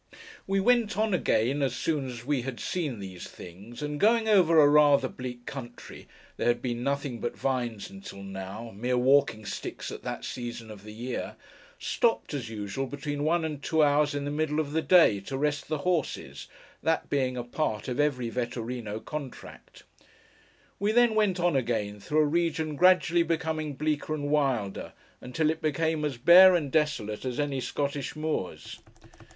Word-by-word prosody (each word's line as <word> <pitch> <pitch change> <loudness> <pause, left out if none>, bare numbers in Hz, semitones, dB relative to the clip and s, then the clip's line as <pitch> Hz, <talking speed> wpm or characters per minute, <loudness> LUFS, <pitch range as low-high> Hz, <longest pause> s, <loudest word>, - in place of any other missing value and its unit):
We 195 0 +1
went 230 -1 +2
on 215 -1 +1
again, 140 -5 +1
as 130 -3 0
soon 145 +1 -1
as 120 -1 -8
we 140 -2 0
had 125 -1 -6
seen 155 -10 -2
these 95 -3 -8
things, 100 - -10
and 150 0 -3
going 225 +1 +3
over 180 -6 +5
a 145 - +7
rather 145 -2 +5
bleak 125 -1 -8
country 120 -3 -9 0.3
(there - - -1
had 120 0 +3
been 120 -1 -3
nothing 140 -2 -2
but 120 - -4
vines 120 -5 -2
until 195 - -10
now: 95 +4 -7
mere 125 +4 0
walking 125 -4 +3
sticks - - -5
at - - -7
that - - -5
season 120 -2 -6
of 105 -2 -11
the 105 - -10
year), 120 +4 -5 0.4
stopped, 230 -8 0
as 135 -6 -4
usual, 110 +5 -4
between 145 +1 -4
one 165 +1 +1
and 150 -3 -5
two 160 +1 +2
hours 145 0 +3
in 140 0 -2
the 145 - -2
middle 155 0 0
of 145 -2 -2
the 160 +2 +1
day, 165 - +5
to 135 +7 -5
rest 145 0 -1
the 155 - -1
horses; 175 -5 -2 0.3
that 165 0 0
being 130 -3 0
a 120 - -2
part 120 -3 -2
of 125 +1 -3
every 125 -6 0
Vetturíno 120 -3 -4
contract. 145 -4 -8 1.0
We 205 +2 +1
then 240 -1 +5
went 210 -4 +2
on 175 -3 +2
again, 110 -5 -1
through 150 +9 +1
a - - +4
region 160 -1 0
gradually 175 0 +4
becoming 160 -3 -2
bleaker 155 +1 -1
and 145 -1 -3
wilder, 130 -10 0 0.3
until 155 +5 0
it 160 +1 -6
became 160 0 0
as 145 -4 -2
bare 180 +7 +8
and 150 -6 -1
desolate 150 -9 0
as 130 0 -3
any 140 -2 -1
Scottish 140 +2 -3
moors. 155 -11 -4
145 Hz, 175 wpm, -28 LUFS, 120-160 Hz, 1.0 s, bare